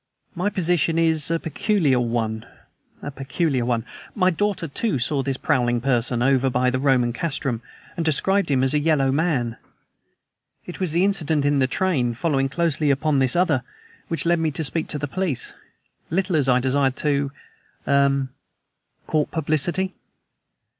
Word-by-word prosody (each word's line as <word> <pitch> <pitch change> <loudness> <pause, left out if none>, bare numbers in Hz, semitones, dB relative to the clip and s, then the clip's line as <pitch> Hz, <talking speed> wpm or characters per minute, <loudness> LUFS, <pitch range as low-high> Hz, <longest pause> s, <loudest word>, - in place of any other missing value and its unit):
My 180 +4 -1
position 170 -4 +1
is 160 -3 +2
a 165 0 0
peculiar 165 - +1
one 115 -2 -2 0.6
a 145 - -4
peculiar 135 0 -1
one. 120 -2 -1 0.3
My 185 -3 +3
daughter, 200 -1 -1
too, 190 +4 -1
saw 135 +3 0
this 135 0 -2
prowling 120 -5 +1
person, 120 -1 +1
over 135 0 +3
by 125 0 +1
the 130 - -1
Roman 130 -3 +2
castrum, 135 -5 -3 0.3
and 170 - -2
described 190 +6 +1
him 130 -2 +2
as 135 - +2
a 150 - +3
yellow 145 -3 +2
man. 135 -6 0 1.1
It 175 - -8
was 185 -4 -1
the 175 +3 +3
incident 160 -7 0
in 145 -1 +2
the 130 - +3
train 130 -7 0
following 135 -1 0
closely 160 -1 0
upon 140 +1 +2
this 130 +1 +2
other, 170 -7 +2 0.5
which 165 +2 -3
led 170 0 +3
me 160 -1 +1
to 155 +2 -3
speak 160 +2 0
to - - -2
the 145 0 -3
police, 175 -3 -2 0.6
little 185 +1 0
as 140 -4 +2
I 125 0 +4
desired 130 +1 +1
to 140 -1 0 0.6
er 140 -1 +2 0.8
court 155 -2 0
publicity." 170 +4 -1
145 Hz, 160 wpm, -23 LUFS, 130-165 Hz, 1.1 s, I